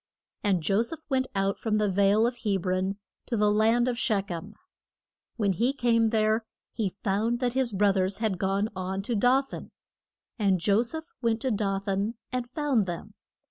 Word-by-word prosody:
And 190 -5 +1
Jo 195 +5 +2
seph 310 +8 -4
went 260 -2 +1
out 195 0 0
from 215 -2 0
the 210 -1 +2
vale 200 +3 +3
of 240 +1 -1
Heb 200 -6 -1
ron 185 +2 0 0.3
to 235 - -1
the 210 0 +3
land 225 +3 +3
of 245 -1 -1
Shech 205 -5 0
em. 175 +5 -6 0.8
When 205 -4 +1
he 235 +9 +1
came 230 -4 +2
there 220 0 +2 0.3
he 215 -4 -1
found 220 +4 +1
that 245 -2 0
his 260 -2 +1
broth 200 0 +2
ers 190 +1 +1
had 215 -5 -1
gone 195 +2 0
on 190 +1 -3
to 235 - -2
Do 250 +5 +4
than. - - -7 0.7
And 195 -3 +2
Jo 200 +5 +3
seph 315 +7 -5
went 230 -2 +1
to 260 - 0
Do 200 -2 0
than 200 +3 -1 0.2
and 250 -1 -3
found 265 -7 +1
them. 175 -1 -6
215 Hz, 190 wpm, -27 LUFS, 195-235 Hz, 0.8 s, Do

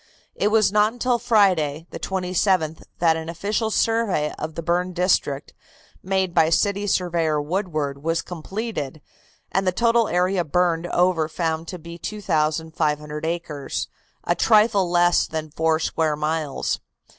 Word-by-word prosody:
It - - 0
was 215 -2 +3
not 210 +1 +3
until 245 0 0
Friday, 185 - +2
the - - -6
27th, 185 -3 0
that 165 -2 +3
an 160 0 -5
official 205 +6 -1
survey 220 -9 +1
of 155 0 -5
the 165 - -4
burned 180 +2 0
district, 170 -6 0 0.5
made 190 -1 0
by 160 -1 +4
City 200 +4 +1
Surveyor 170 -5 +1
Woodward, 155 -4 -2
was 165 +2 0
completed, 175 - -5 0.5
and 190 0 0
the - - +4
total 230 +3 +2
area 180 +1 +1
burned 170 +1 +1
over 175 -3 +2
found 165 0 -2
to 180 - -6
be 170 +1 -10
2,500 155 -5 -1
acres, 165 -4 -3 0.4
a - - +2
trifle 210 -4 +3
less 175 0 +3
than 155 -1 -5
four 160 +1 +1
square 160 -1 0
miles. 150 -1 -2
175 Hz, 140 wpm, -23 LUFS, 160-195 Hz, 0.5 s, by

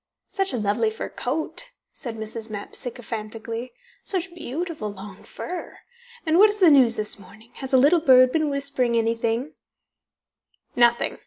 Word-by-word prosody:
"Such 390 -1 0
a - - -2
lovely 215 +1 +1
fur 220 - -6
coat," 315 - -3 0.2
said 230 -3 -7
Mrs. 220 +1 -6
Mapp 205 -1 -7
sycophantically. 230 0 -4 0.3
"Such 370 -2 -1
beautiful 320 - -4
long 195 0 -11
fur! 360 -1 -7 0.5
And 320 +2 +3
what 425 +2 +8
is 415 0 -3
the 355 -5 +7
news 255 -5 +6
this 210 -1 -1
morning? 210 +5 -16
Has 265 - -6
a 265 - +6
little 295 +7 +5
bird 255 -4 +6
been 310 0 +1
whispering 280 -4 -1
anything?" 230 +4 0
245 Hz, 145 wpm, -24 LUFS, 225-315 Hz, 0.5 s, what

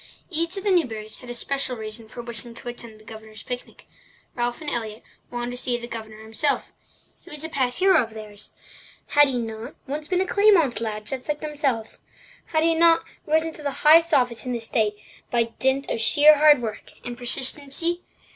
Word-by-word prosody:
Each 335 +3 0
of 390 - -4
the 410 - +2
Newburys 220 - 0
had 250 - -11
a 240 - -4
special 270 0 -1
reason 220 +1 -7
for 240 +2 -9
wishing 235 0 -8
to 240 - -10
attend 235 -2 -7
the 215 - -19
Governor's 220 -1 -10
picnic. 245 0 -7 0.5
Ralph 240 +1 -2
and 310 -2 -4
Elliott 220 -2 -4 0.3
wanted 240 0 -4
to 245 - -4
see 245 -1 0
the 235 0 -8
Governor 220 -2 -8
himself. 225 +7 -1 0.5
He - - -15
was 300 0 -7
a 320 - -4
pet 255 -5 0
hero 375 -3 +5
of 225 -2 -6
theirs. 210 -2 -10 0.6
Had 290 0 +6
he 260 -2 -1
not 225 +2 -5
once 300 +2 -4
been 365 +1 +1
a 380 - +2
Claymont 350 - +4
lad 215 -2 -4
just 260 +5 -5
like 300 0 -1
themselves? 285 -7 -2 0.5
Had 315 -1 +1
he 330 0 +4
not 330 0 +5 0.2
risen 320 +1 +1
to 310 - -10
the 290 - -1 0.2
highest 330 +2 +7
office 245 -5 +2
in 250 - -3
the 235 - -2
state 220 -2 0 0.3
by 230 -1 0
dint 265 +1 +1
of 225 - -1
sheer 290 +8 +7
hard 295 -4 +6
work 220 -1 -6
and 245 - -5
persistency? 275 +7 0
245 Hz, 200 wpm, -24 LUFS, 225-305 Hz, 0.6 s, highest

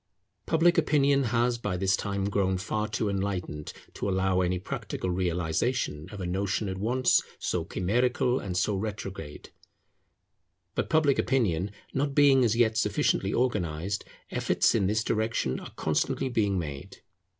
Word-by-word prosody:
Public 165 +1 +4
opinion 140 -3 +3
has 120 +1 +1
by 105 -5 -2
this 95 +1 +2
time 100 -1 -2
grown 95 -2 +1
far 105 +3 -2
too 110 0 -2
enlightened 95 -6 -3 0.2
to - - -3
allow 95 -1 +2
any 90 0 +1
practical 90 0 -4
realization 90 - -1
of 105 - -9
a 90 - -3
notion 95 +3 -1
at 95 0 -4
once 125 +5 +3 0.2
so - - -1
chimerical 125 +6 +1
and 90 -2 -4
so 105 +3 +1
retrograde. 95 -7 -6 1.2
But - - -2
public 155 -4 +3
opinion 100 -9 +1 0.2
not 140 +1 -1
being 140 -3 +6
as 115 -2 +2
yet 110 -2 +3
sufficiently - - +1
organized, 95 -6 -1 0.3
efforts - - +2
in 95 - +2
this 110 +2 +1
direction 110 - -1
are - - -9
constantly 135 - 0
being 105 -5 +1
made. 70 -5 -6
100 Hz, 145 wpm, -28 LUFS, 90-120 Hz, 1.2 s, being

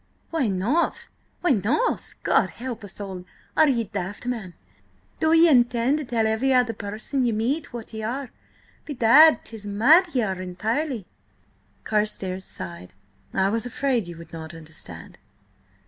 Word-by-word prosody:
"Why 320 -7 +1
not? 210 - 0 0.3
Why 350 - +2
not? 245 - 0
God - - +3
help 240 -3 -6
us 205 - -9
all! 190 -3 -6 0.3
are 315 - +5
ye 235 -4 +1
daft, 200 0 -5
man? 220 -8 -4 0.6
Do 315 - +2
ye 330 +1 +7
intend 245 0 +3
to 300 - -4
tell 230 -2 0
every 220 +5 +1
other 245 -2 +3
person 220 +6 -3
ye 240 - +2
meet 245 +8 -1
what 235 -3 -8
ye 220 - -5
are? 245 +4 -4 0.5
Bedad, 285 +1 +6
'tis 220 -2 -10
mad 280 - +4
ye 245 - +3
are 190 -3 -2
entirely!" 220 - -2 0.8
Carstares 200 -3 -1
sighed. 90 0 -8 0.4
"I 190 0 +2
was 230 +3 -1
afraid 245 -5 0
you 170 -1 -8
would 165 -1 -13
not 160 0 -7
understand." 155 - -10
225 Hz, 150 wpm, -24 LUFS, 195-265 Hz, 0.8 s, ye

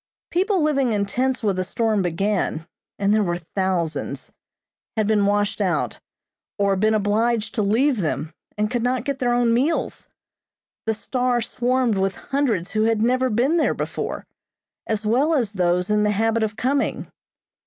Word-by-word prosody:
People 375 0 +1
living 275 -6 +2
in 200 -1 +1
tents 255 +5 -1
when 200 -3 +1
the 185 - -1
storm 220 +2 0
began 180 -2 -1 0.3
and 200 +1 +2
there 215 - +3
were 175 -3 0
thousands 175 -1 -2 0.7
had 215 - +2
been 205 -1 +2
washed 205 +1 0
out, 185 -4 -1 0.6
or 200 -1 +2
been 215 +3 +2
obliged 215 +2 +1
to 220 - 0
leave 230 +4 +2
them, 155 0 -2 0.2
and 210 0 0
could 245 -2 0
not 250 +1 0
get 280 -1 -2
their 245 -1 +1
own 240 -1 +3
meals. 280 +8 -1 0.8
The 220 - +1
"Star" 250 +2 0
swarmed 245 -1 0
with 190 -1 0
hundreds 235 -10 -1
who 215 0 +1
had 225 -1 +2
never 255 +2 +2
been 250 +9 +2
there 325 - +2
before, - - -4 0.6
as 220 -1 -1
well 270 +9 +2
as 230 -7 0
those 180 0 +1
in 210 0 +3
the 210 - +2
habit 225 +2 +1
of 215 -1 -1
coming. 265 +5 -1
220 Hz, 165 wpm, -22 LUFS, 200-250 Hz, 0.8 s, there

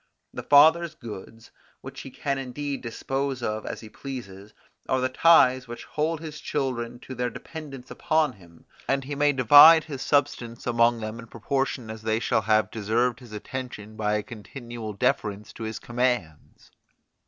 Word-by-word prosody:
The - - -5
father's 160 +3 +5
goods, 115 -1 -10 0.3
which - - -9
he - - -9
can 140 -1 -3
indeed 140 +2 -4
dispose 135 +2 -3
of 110 -1 -3
as - - -5
he 110 - -10
pleases, 105 -7 -8 0.4
are 130 - +2
the 130 0 0
ties 130 -4 +5
which 120 0 -8
hold 155 +1 -2
his 155 -2 -7
children 125 -4 -3
to 130 - -8
their 125 -1 -2
dependence 140 -3 -9
upon 155 -4 +1
him, 85 -5 -19 0.2
and 135 0 0
he 140 +2 -6
may 145 +1 +3
divide 145 +5 +8
his 140 -5 -7
substance 125 -5 0
among 120 -1 +2
them 110 +1 -5
in 115 - -10
proportion 125 0 -2
as 110 0 -9
they 110 0 0
shall 110 - +1
have 110 +1 +2
deserved 115 +3 0
his 120 -4 -14
attention 110 -1 -7
by 105 -1 0
a 105 - -1
continual 115 0 -8
deference 105 +1 -1
to - - -12
his 110 0 -4
commands. 120 - -3
125 Hz, 165 wpm, -26 LUFS, 110-140 Hz, 0.4 s, divide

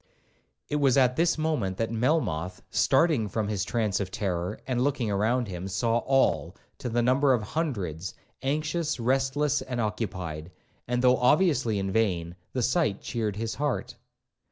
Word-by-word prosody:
It 150 - -1
was 140 -2 +3
at 125 -2 +4
this 170 +3 +2
moment 150 -13 -1
that 115 0 -1
Melmoth, 105 - 0
starting 135 -5 +3
from 105 +1 -2
his 100 -3 -1
trance 105 -2 0
of 100 -2 -2
terror, 95 0 -2
and 125 -2 -1
looking 130 -6 0
round 115 +4 +1
him, 90 -1 -5
saw 115 +5 +1
all, 135 +2 +1 0.2
to 125 - -4
the 120 +1 +1
number 130 +2 +4
of 115 -4 0
hundreds, 100 - -3 0.3
anxious, 155 +2 -1
restless, 135 +4 +1
and 125 -2 -4
occupied; 95 -8 -3 0.4
and, 125 +1 0
though 125 0 +5
obviously 125 - +3
in 95 0 -1
vain, 90 -6 0 0.2
the 125 - -1
sight 125 - +1
cheered 110 -4 -2
his 110 +1 -3
heart. 130 -4 -2
120 Hz, 155 wpm, -27 LUFS, 100-135 Hz, 0.4 s, though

